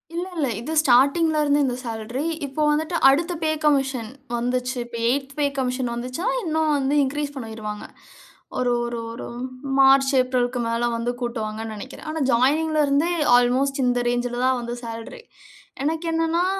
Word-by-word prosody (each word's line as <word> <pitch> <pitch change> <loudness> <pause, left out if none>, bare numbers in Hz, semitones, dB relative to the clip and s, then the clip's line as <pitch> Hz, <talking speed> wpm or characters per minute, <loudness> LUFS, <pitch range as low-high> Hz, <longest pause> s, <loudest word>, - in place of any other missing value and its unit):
இல்லல்ல. 350 -4 -2
இது 280 +8 -5
ஸ்டார்ட்டிங்ல 295 +4 +4
இருந்து 290 0 +3
இந்த 250 -2 -1
சேல்ரி. 230 +5 -4 0.2
இப்போ 280 +2 -4
வந்துட்டு 315 +3 0
அடுத்த 330 +6 +2
பே 315 - +1
கமிஷன் 270 -6 +1 0.3
வந்துச்சு. 250 +1 -1
இப்போ 235 -1 -8
8த் 270 +2 -1
பே 290 - +3
கமிஷன் 250 -1 -1
வந்துச்சுன்னா, 255 - -3
இன்னும் 315 -2 +1
வந்து 275 +1 0
இன்கிரீஸ் 290 +1 -3
பண்ணிருவாங்க. 220 -4 -6 0.7
ஒரு 250 -1 +1
ஒரு 235 0 -4
ஒரு 230 - -7 0.5
மார்ச், 270 0 +6
ஏப்ரல்க்கு 250 -1 -1
மேல 230 +1 -1
வந்து 235 +1 -1
கூட்டுவாங்கன்னு 220 -2 -4
நெனைக்கிறேன். 260 +8 -9
ஆனா, 320 - -3
ஜாயினிங்ல 305 +6 +2
இருந்தே 290 +5 +2 0.3
அல்மோஸ்ட் 265 +3 +1
இந்த 245 0 +2
ரேஞ்சுல 245 0 -1
தான் 260 -1 +2
வந்து 235 0 -4
சேல்ரி. 230 - -8 0.6
எனக்கு 320 +2 -1
என்னனன்னா, 330 +2 +1
265 Hz, 150 wpm, -23 LUFS, 240-300 Hz, 0.7 s, மார்ச்